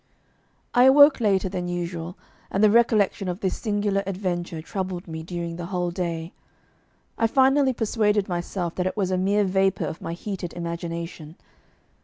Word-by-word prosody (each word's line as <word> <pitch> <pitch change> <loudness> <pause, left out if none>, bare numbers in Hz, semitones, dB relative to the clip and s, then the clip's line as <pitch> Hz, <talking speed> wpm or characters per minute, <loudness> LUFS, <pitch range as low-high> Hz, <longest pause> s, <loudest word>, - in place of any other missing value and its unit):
I 245 +1 +6
awoke 285 +2 +7
later 195 -4 +2
than 180 -1 -4
usual, 175 0 -4 0.3
and 195 - 0
the 210 - +6
recollection 215 -4 +3
of 180 +2 -4
this 190 - 0
singular 205 -2 0
adventure 180 -3 -3
troubled 185 +2 -5
me 160 -1 -6
during 170 0 -5
the 175 -1 -5
whole 180 -2 -2
day. 170 -1 -4 0.9
I 225 - +4
finally 265 +2 +3
persuaded 210 -3 +1
myself 175 0 -3
that 180 0 0
it 185 - -4
was 190 -3 0
a 185 - +1
mere 200 +2 +2
vapour 190 0 +1
of 160 - -6
my 165 - -4
heated 180 -1 -5
imagination. 170 -2 -6
185 Hz, 160 wpm, -24 LUFS, 175-205 Hz, 0.9 s, awoke